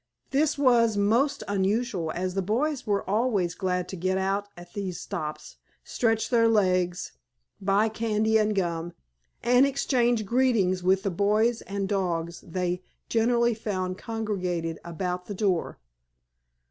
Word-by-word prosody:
This 295 +2 +2
was 235 -6 +4
most 230 +8 +2
unusual, 200 -3 0
as 185 +1 -2
the 195 - 0
boys 250 +8 -1
were 200 -1 0
always 205 -4 +1
glad 180 -2 -1
to - - -5
get 185 +2 0
out 195 +2 -1
at 175 0 -12
these 190 -4 -4
stops, 150 0 -6 0.3
stretch 225 -1 0
their 230 -2 +5
legs, 185 -5 +1 0.5
buy 200 +3 +3
candy 220 0 +1
and 215 0 +1
gum, 170 -2 -2 0.5
and 245 +2 +5
exchange 245 -5 +1
greetings 220 -6 +2
with 190 +1 +2
the 195 - 0
boys 215 +5 +2
and 200 0 -3
dogs 170 -4 -2
they 180 +1 -2 0.3
generally 235 +1 +2
found 185 -4 -3
congregated 185 -7 -3
about 180 +1 -4
the 205 - -5
door. 185 -4 0
200 Hz, 135 wpm, -27 LUFS, 180-230 Hz, 0.5 s, their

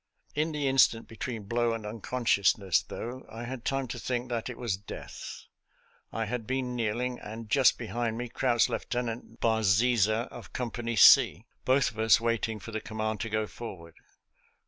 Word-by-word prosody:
In 155 +2 0
the 150 -2 -1
instant 130 -4 +4
between 115 0 -5
blow 115 +3 0
and 115 -2 -5
uncon 115 +4 -5
sciousness, 100 -4 +3
though, 125 +3 -6
I 115 +2 -7
had 120 0 -6
time 135 -1 -1
to - - -5
think 125 0 -2
that 120 0 -2
it 125 - -7
was 115 -6 -1
death. 100 +1 -9 0.7
I 115 - -2
had 115 0 -4
been 130 -1 -2
kneeling, 120 +2 -1
and 110 +1 -8
just 135 -2 +5
behind 115 0 -2
me 125 +1 -3
crouched 120 -1 +2
Lieutenant 120 -2 -4
Barziza, 110 +1 +3
of 120 - -11
Company 120 -1 -3
C, 105 -1 +7 0.2
both 130 +1 +3
of 110 - -12
us 110 0 +5
waiting 115 -1 -1
for 115 - -9
the 110 0 -3
command 110 -1 -3
to 115 - -3
go 110 0 0
for 115 -2 -8
ward. 85 -1 -14
115 Hz, 175 wpm, -29 LUFS, 110-125 Hz, 0.7 s, C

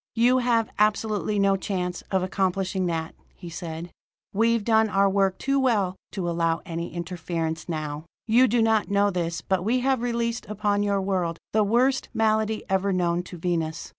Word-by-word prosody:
"You 245 +3 +4
have 235 -3 +1
absolutely 210 -2 +1
no 195 -1 +3
chance 180 -2 -3
of 190 -2 +1
accomplishing 190 0 -1
that," 165 -1 -3 0.2
he 175 -3 -10
said. 165 0 -6 0.4
"We've 230 +1 +2
done 220 0 +3
our 195 0 +3
work 195 -1 +1
too 275 0 0
well 210 -8 +1 0.2
to 185 -4 -3
allow 165 -1 0
any 170 0 -4
interference 165 -1 -4
now. 155 -1 -4 0.2
"You 240 +3 +5
do 230 0 +2
not 220 -2 +2
know 200 0 +3
this, 170 -2 -2
but 190 -1 -1
we 245 +5 +1
have 265 -1 +1
released 235 -1 -2
upon 205 -1 0
your 200 -1 +1
world 180 -4 -1 0.2
the 215 0 +4
worst 250 +6 +2
malady 220 -1 +1
ever 195 0 +1
known 175 -1 +1
to 180 0 -10
Venus. 165 -1 -2
195 Hz, 170 wpm, -25 LUFS, 175-220 Hz, 0.4 s, You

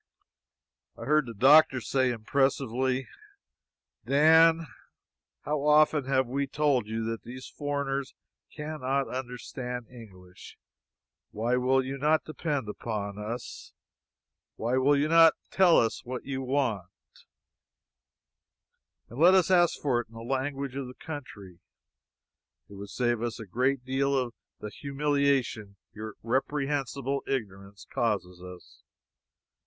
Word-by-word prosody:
I - - -8
heard 150 -2 +2
the 115 - -8
doctor 135 +4 +6
say 130 +2 0
impressively: 130 +1 0 1.0
"Dan, 160 +3 +5 0.8
how 150 -1 -2
often 150 -1 +4
have 130 0 +2
we 140 +3 -2
told 140 -5 +1
you 110 +1 -3
that 115 0 -4
these 130 +2 -9
foreigners 140 -2 -3 0.4
cannot 140 -3 -2
understand 125 -1 -6
English? 95 -7 -14 0.7
Why 115 +4 -1
will 130 +1 +2
you 135 +1 -5
not 155 +2 +2
depend 150 -5 -3
upon 105 -1 -5
us? 115 +3 -7 0.8
Why 120 +3 -1
will 140 +2 +3
you 145 +2 +1
not 165 0 +6 0.2
tell 185 -3 +5
us 115 -1 +1
what 125 +1 -6
you 135 -1 -4
want, 130 -8 -1 2.2
and 120 - -10
let 180 +4 +7
us 190 0 +3
ask 175 -2 +4
for 125 -5 +1
it - - -14
in 115 - -19
the 115 - -8
language 135 +2 -3
of 135 -2 -4
the 125 - -11
country? 100 - -9 1.1
It - - -14
would 100 0 -9
save 120 -2 -1
us 120 -1 -3
a 110 - -7
great 125 +6 -1
deal 135 +1 0
of 125 -3 -2 0.3
the 105 - -6
humiliation 140 -7 -1 0.2
your 110 0 -8
reprehensible 140 +2 -1
ignorance 100 -6 -5
causes 95 -6 -2
us. 90 -1 -13
130 Hz, 125 wpm, -28 LUFS, 115-140 Hz, 2.2 s, let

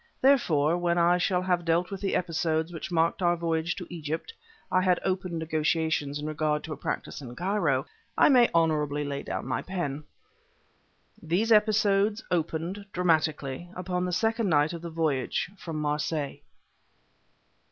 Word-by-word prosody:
Therefore, 175 - +3
when 175 0 +1
I 175 +1 +4
shall 180 0 +1
have 180 -1 +1
dealt 170 +2 +1
with 195 - -5
the 195 - 0
episodes 165 -1 0
which 165 +2 -6
marked 165 +2 +1
our 175 -1 +3
voyage 165 0 -1
to 180 - -6
Egypt 160 - -4 0.4
I 185 - +4
had 180 -1 +3
opened 185 -2 -1
negotiations 160 -2 0
in 150 - -5
regard 155 -1 -1
to 160 - -5
a - - -5
practice 145 - -4
in 125 -3 -9
Cairo 170 -6 0 0.3
I - - +6
may 250 -4 +6
honorably 150 -3 +1
lay 140 -1 -3
down - - -4
my 130 - -1
pen. 155 -6 -4 1.2
These 180 +8 0
episodes 210 -1 +3
opened, 170 +3 -2
dramatically, 160 -3 0
upon 180 0 -2
the 180 - -2
second 225 +2 +1
night 150 0 +3
of 170 - -6
the 170 - -6
voyage 160 0 -1
from 165 -4 -7
Marseilles. 150 0 -2
170 Hz, 155 wpm, -27 LUFS, 155-180 Hz, 1.2 s, I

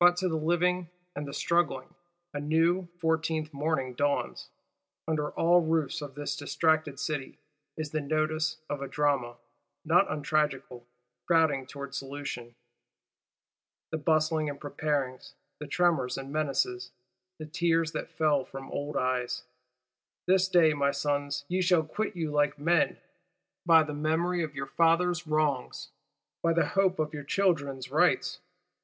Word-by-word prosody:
But, 175 0 +6
to 185 - +1
the 165 - -1
living 175 +2 +1 0.3
and 145 0 -4
the - - -6
struggling, 155 0 0 0.4
a 145 - -3
new, 165 +5 +2
Fourteenth 160 -2 0
morning 140 -3 -1
dawns. 145 +3 -1 0.6
Under 150 -2 0
all 175 +1 +4
roofs 160 -1 0
of 140 -2 -7
this 145 0 -3
distracted 155 -1 0
City, 150 -3 -3 0.4
is 155 -2 -4
the 155 - 0
nodus 155 +1 0
of 145 -1 -4
a 140 - -3
drama, 140 -5 0 0.5
not - - +4
untragical, 145 -5 -1 0.4
crowding 155 -6 +3
towards 140 -1 -7
solution. 135 -4 -6 1.4
The 160 - -2
bustlings 155 0 +1
and 140 -1 -6
preparings, 145 -3 -3 0.2
the 150 - -6
tremors 160 -5 +1
and 135 +1 -7
menaces; 130 -5 -1 0.5
the 155 - -7
tears 165 0 +1
that - - -4
fell 150 -4 +2
from 135 +1 -9
old 145 +1 -3
eyes! 125 -1 -1 0.8
This 190 +1 +4
day, 170 -4 +5
my 140 -1 +1
sons, 145 0 -1
ye 185 +3 0
shall 180 -3 +4
quit 205 +6 -3
you 160 -3 -2
like 145 0 +1
men. 165 +3 +2 0.7
By 165 -2 +7
the 150 -1 -5
memory 160 +4 0
of 155 -3 -4
your 135 -1 -3
fathers' 170 +2 +2
wrongs, 150 -4 -1 0.5
by 165 0 +2
the 170 - +3
hope 190 -2 +2
of 155 0 -1
your 145 -1 -5
children's 140 -7 0
rights! 180 +3 +2
155 Hz, 145 wpm, -29 LUFS, 140-165 Hz, 1.4 s, By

